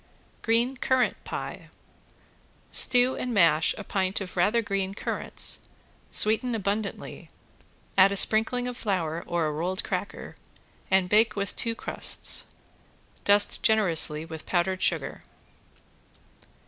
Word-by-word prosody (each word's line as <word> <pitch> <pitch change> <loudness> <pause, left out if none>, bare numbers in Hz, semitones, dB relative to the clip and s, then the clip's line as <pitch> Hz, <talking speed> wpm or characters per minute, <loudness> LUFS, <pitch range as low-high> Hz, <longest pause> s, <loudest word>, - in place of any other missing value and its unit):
~GREEN 235 +4 0
CURRANT 260 -1 0
PIE~ - - -7 1.0
Stew 250 0 +4
and 250 -2 -4
mash 165 -4 +3
a 210 - -7
pint 190 -1 -2
of 190 -2 -8
rather 210 +6 +1
green 195 -2 -3
currants, - - -3 0.4
sweeten 225 +3 +2
abundantly, 200 0 -4 0.7
add 190 +1 +6
a - - -2
sprinkling 225 +5 +3
of 250 - -5
flour 170 -8 -3
or 170 -2 -1
a 155 - -1
rolled 175 +5 -3
cracker - - -5 0.6
and 190 -1 +2
bake 210 +3 +3
with 200 -1 -3
two 230 -1 -1
crusts. - - -1 0.8
Dust 205 0 +4
generously 165 -8 +2
with 160 -1 -10
powdered 185 +1 -1
sugar. - - -1
200 Hz, 120 wpm, -26 LUFS, 180-225 Hz, 1.0 s, add